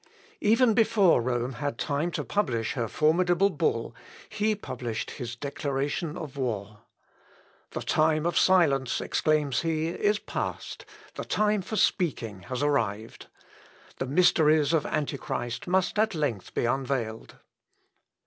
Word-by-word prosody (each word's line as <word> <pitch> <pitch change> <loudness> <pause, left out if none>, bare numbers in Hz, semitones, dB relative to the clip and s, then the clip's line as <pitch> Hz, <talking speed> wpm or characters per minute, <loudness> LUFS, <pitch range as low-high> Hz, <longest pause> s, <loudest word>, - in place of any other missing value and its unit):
Even 230 +2 +4
before 210 - +4
Rome 120 +1 -1
had 140 -2 -3
time 150 +3 -1
to - - -2
publish 120 - -1
her 120 -3 -2
formidable 175 - +2
bull, 440 - -1 0.4
he 215 0 0
published 120 - -5
his 120 -2 -6
declaration 140 +3 -3
of 150 -5 -7
war. 105 -5 -3 0.9
"The - - -5
time 155 0 +2
of 170 - 0
silence," 140 -9 +3
exclaims 150 -4 +1
he, 160 -1 -1
"is 205 +4 +1
past; - - -5 0.3
the - - -5
time 210 -1 +1
for 205 +4 -5
speaking 125 - 0
has 130 +2 -2
arrived. 115 -7 -1 0.7
The 130 - -2
mysteries 155 -1 +4
of 160 -2 +1
Antichrist 140 -5 -3
must 185 +3 +1
at 220 -3 +2
length 135 - -3
be - - +1
unveiled." 125 -3 -2
150 Hz, 130 wpm, -27 LUFS, 125-180 Hz, 0.9 s, Even